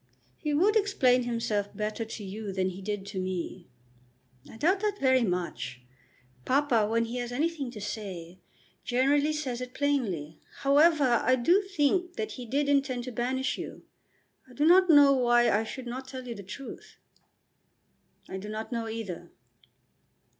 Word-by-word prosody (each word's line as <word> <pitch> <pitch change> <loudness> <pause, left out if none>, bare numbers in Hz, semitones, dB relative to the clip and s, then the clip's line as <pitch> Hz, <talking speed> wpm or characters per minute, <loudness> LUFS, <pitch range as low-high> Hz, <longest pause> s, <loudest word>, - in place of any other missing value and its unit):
"He 300 - -2
would 375 +9 +3
explain 260 - +3
himself 220 -4 -2
better 215 +1 -2
to 225 -1 -7
you 200 +1 -6
than 190 0 0
he 185 +1 -8
did 205 0 -4
to 200 -1 -5
me." 185 -1 -4 0.8
"I - - -11
doubt 360 - +2
that 415 0 -1
very 260 -1 +4
much. 170 - -3 0.6
Papa, 255 - +2
when 230 +1 +1
he 235 +2 -5
has 245 0 -4
anything 290 0 -1
to 230 - -9
say, 185 -4 -6 0.4
generally 280 +4 +2
says 265 -5 -3
it 250 +1 -7
plainly. 220 - -1 0.2
However, 280 -3 +4
I 255 +2 +4
do 340 +11 +3
think 360 -1 0
that 215 0 -3
he 245 +2 -8
did 280 +4 0
intend 275 -3 +1
to 255 - -6
banish 260 +3 -1
you. - - -7 0.7
I - - -14
do 295 - +1
not 365 +2 +6
know 290 -3 +8
why 240 -2 +4
I 210 +2 +2
should 255 +3 -7
not 255 +2 -6
tell 260 -1 -8
you 235 - -4
the 200 - -9
truth." 205 +8 -10 1.3
"I 190 - -5
do 210 +2 -8
not 215 +2 -5
know 230 -2 -2
either." 220 -6 -6
245 Hz, 165 wpm, -28 LUFS, 210-285 Hz, 1.3 s, know